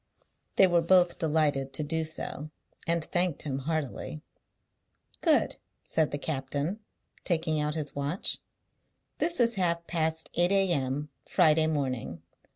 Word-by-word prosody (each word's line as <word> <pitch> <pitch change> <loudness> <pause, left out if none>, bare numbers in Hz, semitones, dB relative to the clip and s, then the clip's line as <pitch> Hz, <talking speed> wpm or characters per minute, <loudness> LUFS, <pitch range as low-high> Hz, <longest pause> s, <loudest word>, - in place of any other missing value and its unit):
They 195 - +7
were 175 -2 +3
both 175 +1 +4
delighted 150 -4 +1
to 155 - -2
do 160 +2 -1
so, 155 -1 -4 0.4
and 170 -1 +1
thanked 175 -3 0
him 135 -3 -2
heartily. 140 - -3 1.0
"Good," - - +2 0.3
said 160 -2 +1
the 145 - -3
captain, 145 +6 -3 0.4
taking 160 -3 0
out 150 +1 0
his 150 -2 -4
watch. 145 +6 -1 0.8
"This 340 -1 +1
is 235 -1 +4
half 170 -1 0
past 160 -1 -1
eight 175 +2 +2
a.m., 150 -7 +1 0.2
Friday 160 -3 +4
morning. 130 - -2
160 Hz, 130 wpm, -29 LUFS, 145-170 Hz, 1.0 s, They